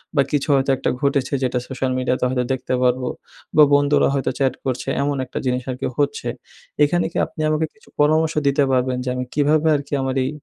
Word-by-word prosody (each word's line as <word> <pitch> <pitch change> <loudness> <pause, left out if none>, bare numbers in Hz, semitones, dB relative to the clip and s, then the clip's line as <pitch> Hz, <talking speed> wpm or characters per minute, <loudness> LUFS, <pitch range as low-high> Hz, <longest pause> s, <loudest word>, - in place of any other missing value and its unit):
বা 140 - +5
কিছু 145 -2 0
হয়তো 135 0 +1
একটা - - -1
ঘটেছে 140 -1 0
যেটা 125 0 0
সোশ্যাল 130 0 -2
মিডিয়া 130 0 0
তে - - +1
হয়তো 125 -1 0
দেখতে 130 - -3
পারবো। 125 0 +1 0.5
বা 155 - +9
বন্ধুরা 145 0 +4
হয়তো 135 -1 0
চ্যাট 135 -2 +2
করছে 130 -2 -2
এমন 140 0 0
একটা - - -8
জিনিস 125 0 0
আর - - -4
কি - - 0
হচ্ছে। 145 0 0 0.6
এখানে 165 +3 +2
কি - - -5
আপনি 155 - -8
আমাকে 155 +1 +1
কিছু 220 - -23
পরামর্শ 155 +2 +3
দিতে 140 +1 +3
পারবেন, 130 0 +1
যে 130 - -3
আমি 125 - -2
কীভাবে 150 +2 +2
আর 145 - -1
কি - - 0
আমার 130 0 -2
এই - - -1
140 Hz, 220 wpm, -21 LUFS, 130-145 Hz, 0.6 s, বা